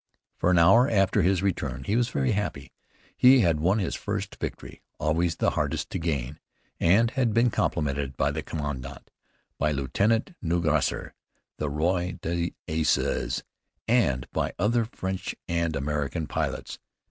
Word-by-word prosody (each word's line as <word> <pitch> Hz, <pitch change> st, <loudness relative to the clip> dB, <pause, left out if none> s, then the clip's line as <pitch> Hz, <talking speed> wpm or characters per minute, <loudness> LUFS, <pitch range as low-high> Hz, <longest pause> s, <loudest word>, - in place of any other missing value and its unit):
For -, -, +1 dB
an 90 Hz, -, +4 dB
hour 115 Hz, +11 st, +6 dB
after 100 Hz, -1 st, +3 dB
his 95 Hz, +1 st, +2 dB
return 100 Hz, -3 st, -2 dB
he 105 Hz, -, -1 dB
was 120 Hz, 0 st, +2 dB
very 65 Hz, -2 st, 0 dB
happy. 95 Hz, -10 st, -3 dB, 0.4 s
He 130 Hz, 0 st, +7 dB
had 85 Hz, -6 st, +2 dB
won 90 Hz, +6 st, +2 dB
his 95 Hz, -6 st, -1 dB
first -, -, -4 dB
victory, -, -, -6 dB, 0.2 s
always 80 Hz, +2 st, +1 dB
the -, -, +1 dB
hardest -, -, -2 dB
to -, -, -2 dB
gain, 75 Hz, -5 st, -2 dB, 0.4 s
and 110 Hz, +7 st, +4 dB
had 125 Hz, -5 st, 0 dB
been 120 Hz, +1 st, +4 dB
complimented 70 Hz, -6 st, -1 dB
by -, -, +1 dB
the -, -, -3 dB
commandant, 75 Hz, -5 st, -6 dB, 0.5 s
by 75 Hz, +1 st, +2 dB
Lieutenant 100 Hz, -, 0 dB
Nungesser, 80 Hz, -3 st, 0 dB, 0.5 s
the 75 Hz, -, -1 dB
Roi 85 Hz, +4 st, 0 dB
des 85 Hz, +1 st, -1 dB, 0.2 s
Aces, 80 Hz, -6 st, 0 dB, 0.4 s
and 70 Hz, -, +2 dB
by -, -, -2 dB
other 115 Hz, +5 st, +2 dB
French 95 Hz, -4 st, -4 dB
and 85 Hz, -2 st, 0 dB
American 75 Hz, +3 st, -2 dB
pilots. -, -, -3 dB
85 Hz, 145 wpm, -26 LUFS, 75-105 Hz, 0.5 s, He